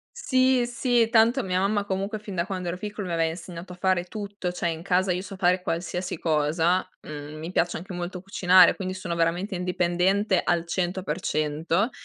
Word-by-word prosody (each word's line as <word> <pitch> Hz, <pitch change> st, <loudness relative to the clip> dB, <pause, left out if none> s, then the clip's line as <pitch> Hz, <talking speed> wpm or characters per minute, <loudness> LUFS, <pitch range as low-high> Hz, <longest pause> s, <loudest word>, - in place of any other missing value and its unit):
Sì, 260 Hz, -, +2 dB
sì, 240 Hz, -1 st, +2 dB
tanto 235 Hz, +3 st, +4 dB
mia 185 Hz, -3 st, 0 dB
mamma 205 Hz, +1 st, +1 dB
comunque 195 Hz, +2 st, -2 dB
fin 205 Hz, -2 st, -8 dB
da 170 Hz, -1 st, 0 dB
quando 185 Hz, -2 st, -4 dB
ero 170 Hz, -, -2 dB
piccolo 205 Hz, 0 st, -5 dB
mi 175 Hz, -, -3 dB
aveva 165 Hz, -1 st, +2 dB
insegnato 170 Hz, +1 st, -8 dB
a 180 Hz, -, -9 dB
fare 185 Hz, -1 st, +1 dB
tutto, 200 Hz, -1 st, -5 dB
cioè 175 Hz, -1 st, -2 dB
in 165 Hz, -1 st, -3 dB
casa 185 Hz, +1 st, +1 dB
io 180 Hz, -, -2 dB
so 195 Hz, 0 st, -9 dB
fare 180 Hz, 0 st, +2 dB
qualsiasi 180 Hz, 0 st, -3 dB
cosa, 165 Hz, +3 st, +1 dB, 0.2 s
mhmm, 150 Hz, 0 st, -7 dB
mi 160 Hz, +2 st, -5 dB
piace 175 Hz, -1 st, +1 dB
anche 180 Hz, +3 st, -8 dB
molto 175 Hz, +1 st, -4 dB
cucinare, 185 Hz, -2 st, +5 dB
quindi 185 Hz, -1 st, -4 dB
sono 185 Hz, -2 st, -4 dB
veramente 175 Hz, +4 st, 0 dB
indipendente 180 Hz, +2 st, +1 dB
al 170 Hz, -1 st, +1 dB
100% 175 Hz, -, -1 dB
180 Hz, 185 wpm, -26 LUFS, 170-195 Hz, 0.2 s, cucinare